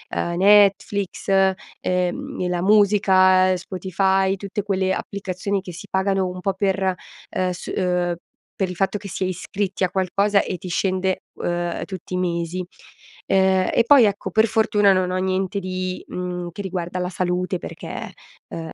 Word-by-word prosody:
uhm, 170 0 -1
Netflix, 200 0 +3 0.5
uhm, 180 0 -2
e 180 - 0
la 180 -1 -1
musica, 190 -2 +4
Spotify, 190 +1 0
tutte 200 +2 -4
quelle 190 -2 0
applicazioni 200 0 -3
che 180 -3 -9
si 180 +4 -10
pagano 190 0 +1
un 180 0 -6
po' 195 - 0
per, 190 -1 0 0.4
ehm, 185 0 -1
s 175 - -6
uhm, 180 -2 0 0.4
per 190 -2 0
il 180 - -6
fatto 195 +3 0
che 200 0 -9
si 185 - -2
è - - 0
iscritti 190 +2 -3
a 185 - +2
qualcosa, 200 +2 +2
e 185 - -4
ti 180 0 -8
scende, 185 +1 0
uhm, 175 0 -2
tutti 185 -2 -8
i 180 - 0
mesi. 175 0 -2 0.6
Ehm, 190 -1 +3
e 235 - +4
poi, 260 -3 +7
ecco, 200 -1 -1
per 220 0 +4
fortuna 210 -2 +3
non 185 -1 0
ho 185 - -1
niente 190 +1 -1
di 185 -1 -4
mhmm, 180 -1 -4
che 200 - -7
riguarda 180 -1 -4
la 180 - -2
salute 180 0 -1
perché, - - -7 0.4
uhm, 165 -1 -5
185 Hz, 165 wpm, -22 LUFS, 180-195 Hz, 0.6 s, poi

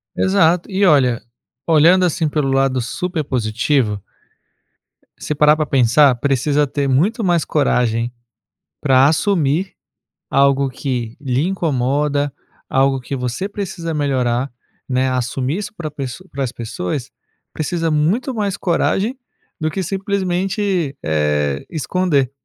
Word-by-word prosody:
Exato. 160 - +2
E 195 0 +2
olha, 130 -8 +3 0.4
olhando 170 +3 +5
assim 165 -2 0
pelo 145 -2 0
lado 135 -1 +2
super 165 +7 -3
positivo 115 -3 0 1.2
se 150 - -3
parar 150 +1 +5
pra 155 0 -1
pensar, 135 +1 +4
precisa 140 +3 +1
ter 140 +1 -1
muito 180 - +1
mais 175 -4 +2
coragem 120 -5 +1 0.7
pra 135 -2 +5
assumir 160 +1 +1 0.6
algo 140 0 +3
que 125 -3 -4
lhe 130 -2 0
incomoda, 145 -4 0 0.4
algo 135 0 +2
que 135 +2 -5
você 125 +10 -3
precisa 190 -5 -5
melhorar, 130 -3 0 0.4
né, 130 0 +1
assumir 130 +4 -1
isso 210 0 -6
pra 155 -3 -5
pessoa 145 +5 -7
pras 135 -3 -3
pessoas, 115 +2 -4 0.4
precisa 165 +1 -2
muito 190 - +1
mais 205 -3 -1
coragem 195 +7 0 0.4
do 155 0 0
que 190 - -3
simplesmente, 190 -3 -1
eh, 75 -2 0
esconder, 155 -4 0
145 Hz, 120 wpm, -19 LUFS, 130-175 Hz, 1.2 s, olhando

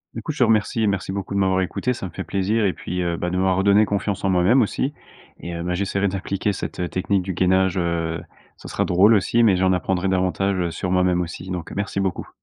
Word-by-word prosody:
Du - - -6
coup, 155 - -3
je 150 - -9
te - - +6
remercie 110 0 +2
et 110 - +2
merci 95 -1 -1
beaucoup 100 0 -4
de - - +1
m'avoir 95 -1 +2
écouté, 115 +7 -1
ça 95 -5 -6
me - - -11
fait - - -5
plaisir 105 +3 0
et 95 - +1
puis, 90 0 -4
heu, 85 -1 -1
bah 90 +1 -3
de 90 - -2
m'avoir 95 -1 +2
redonné 100 +2 +4
confiance 100 -1 -2
en 95 - +2
moi-même 95 +8 +4
aussi 130 +6 -1 0.5
et 85 - -6
heu, 85 - -4
bah, 90 +1 -2
j'essaierai 100 +1 0
d'appliquer 100 +1 -2
cette, 95 - -6
heu, 90 -1 -2
technique 95 +1 0
du 95 0 -4
gainage, 95 +1 +2
heu, 85 -2 -1 0.4
ça - - -11
sera - - -1
drôle 95 +5 +5
aussi, 115 +3 +3
mais 105 -4 +5
j'en 95 0 +2
apprendrai 95 +1 0
davantage, 95 +1 0
heu, 85 -1 -1
sur 90 - -4
moi-même 90 -1 +2
aussi, 90 +2 -6
donc 90 -2 -5
merci 100 0 -2
beaucoup. 95 -2 -2
95 Hz, 250 wpm, -22 LUFS, 90-100 Hz, 0.5 s, te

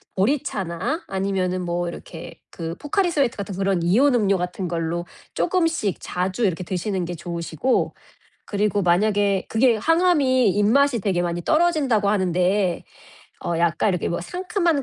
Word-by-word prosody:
보리차나 200 - -1
아니면은 190 -1 -1
뭐 175 0 -2
이렇게 165 -1 -10
그 165 -1 -5
포카리스웨트 295 - 0
같은 200 -2 -5
그런 195 -2 0
이온음료 210 0 +3
같은 180 +1 -3
걸로 170 +1 -2 0.3
쪼금씩 330 - 0
자주 185 +5 -1
이렇게 185 -1 -1
드시는 185 0 -2
게 175 +1 -5
좋으시고. 170 - -1 0.5
그리고 205 0 0
만약에 200 +2 +2
그게 235 +1 +3
항암이 290 - +3
입맛이 235 +5 +3
되게 185 -3 0
많이 175 0 -2
떨어진다고 295 -11 +2
하는데 185 -1 +1 0.6
어 170 - -1
약간 170 +4 +2
이렇게 180 -2 -1
뭐 170 0 -2
상큼한 355 - -1
195 Hz, 335 characters per minute, -23 LUFS, 175-260 Hz, 0.6 s, 이온음료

